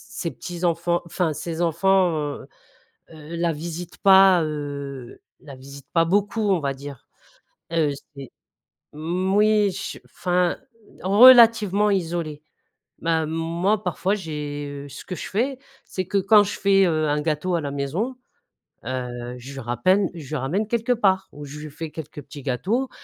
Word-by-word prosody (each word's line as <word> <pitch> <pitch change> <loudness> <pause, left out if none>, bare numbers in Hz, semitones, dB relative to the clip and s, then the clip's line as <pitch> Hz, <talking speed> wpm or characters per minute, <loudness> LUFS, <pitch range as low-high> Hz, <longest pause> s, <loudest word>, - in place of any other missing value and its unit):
ses 170 - -2
petits-enfants, 175 -1 -1
enfin 170 -1 -1
ses 165 +2 -5
enfants, 180 +2 +3 0.3
heu - - -13 0.6
heu, 160 +1 -9
la 170 0 +1
visitent 170 +3 -7
pas, 190 -2 +6
heu, 140 -4 -6 0.2
la 140 -3 -11
visitent 140 +1 -12
pas 165 -1 +4
beaucoup, 205 +4 +1
on 185 -3 +2
va 140 -2 -2
dire, 140 -1 -10 0.6
heu, 165 -3 +2 0.3
c'est 135 -2 -9 0.6
moui, 190 +6 +2
ch 195 - -6
enfin 180 -1 0 0.4
relativement 215 -1 +7
isolée. 165 -5 -2 0.6
Bah, 165 -1 0
moi, 170 +6 0
parfois, 185 +2 0
j'ai, 150 -6 -5 0.2
heu - - -11
ce - - -10
que 180 - -5
je - - -7
fais, 255 +6 -1 0.3
c'est 185 - -4
que 200 - -1
quand 205 +2 +6
je 205 - -5
fais, 195 0 +4
heu, 155 -2 +1
un 150 0 +1
gâteau 160 +4 -1
à 170 - 0
la 140 -2 -4
maison, 160 - -3 0.7
heu, 125 -1 -4
je 130 +3 -10
lui 135 - -7
ramène 150 - +2
je 160 -5 -9
lui 155 - -4
ramène 155 +11 -1
quelques 235 +2 0
parts 190 -4 +1
ou 145 0 -9
je 145 +1 -9
lui 155 -1 -8
fais 160 +2 -6
quelques 150 -1 -8
petits 140 +1 -11
gâteaux 200 - -1
170 Hz, 160 wpm, -23 LUFS, 145-195 Hz, 0.7 s, relativement